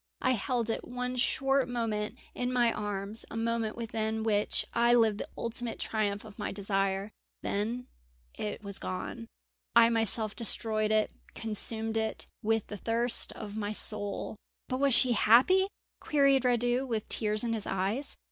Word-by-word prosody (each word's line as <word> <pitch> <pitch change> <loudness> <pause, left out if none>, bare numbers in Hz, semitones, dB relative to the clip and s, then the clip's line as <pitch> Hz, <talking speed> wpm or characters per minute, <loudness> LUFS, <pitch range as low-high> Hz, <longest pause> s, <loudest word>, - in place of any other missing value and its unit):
I 255 - +3
held 240 -1 -1
it - - -3
one 250 0 -4
short 270 +1 +1
moment 220 -3 -2 0.2
in 250 0 -2
my 240 -2 +3
arms, 205 +1 -3
a - - -6
moment 230 -1 -1
within 220 -1 -3
which 210 -2 +1
I 235 +1 +4
lived 220 -3 +3
the - - -5
ultimate 235 0 -3
triumph 205 -1 -2
of 215 0 -13
my 210 - -3
desire. 195 0 -1 0.3
Then 230 +5 -2 0.5
it 210 0 -5
was 200 -1 -1
gone. 185 +5 -5 0.5
I 230 0 +7
myself 225 -1 +2
destroyed 215 -1 +1
it, 215 0 +2 0.2
consumed 220 +1 +2
it, 220 0 -2 0.2
with 225 0 +1
the 205 - -7
thirst 235 +3 +2
of 210 0 -8
my 210 0 -2
soul!" 210 0 0 0.3
"But 255 - -2
was 275 -3 +4
she 255 - +4
happy?" 255 - +5 0.3
queried 275 -3 +3
Radu, 245 +2 +1
with 225 -3 -3
tears 215 0 +3
in 230 -1 -1
his 220 -3 -3
eyes. 200 +9 -2
225 Hz, 155 wpm, -30 LUFS, 210-240 Hz, 0.5 s, I